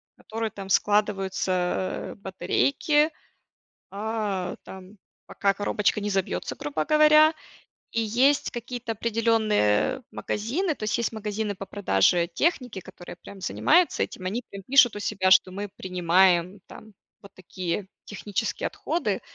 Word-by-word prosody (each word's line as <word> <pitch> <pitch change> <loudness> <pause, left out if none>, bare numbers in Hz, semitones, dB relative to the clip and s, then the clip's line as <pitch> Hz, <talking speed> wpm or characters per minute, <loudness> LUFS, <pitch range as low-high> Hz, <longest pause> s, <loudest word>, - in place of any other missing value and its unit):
в - - -70
которую 225 0 -4
там 195 -1 -9
складываются, 190 -3 0
а, - - -10
батарейки, 280 +10 +1 0.8
а, 205 -3 -3
там 190 +2 -12 0.3
пока 200 -1 0
коробочка 205 +1 0
не 205 - -2
забьется, 195 -2 -2
грубо 150 +1 -3
говоря. 305 +1 +6 0.6
И 230 - 0
есть 250 +6 +2
какие-то 240 0 -5
определенные 225 - +1
магазины, 300 - -2
то - - -9
есть 215 +2 0
магазины 210 -1 -3
по 195 - -7
продаже 170 - +2
техники, 250 - -1
которые 175 0 -11
прям 195 +2 -13
занимаются 335 - +2
этим, 185 - -7
они 220 +7 -2
прям 195 -1 -9
пишут 245 0 +5
у - - -5
себя, 190 -2 0
что 185 0 +6
мы 200 +2 -5
принимаем 180 0 +2
там 215 -1 -13 0.3
вот 200 - -14
такие 185 +1 -5 0.2
технические 205 -1 -3
отходы. 340 +2 -2
205 Hz, 130 wpm, -25 LUFS, 185-230 Hz, 0.8 s, говоря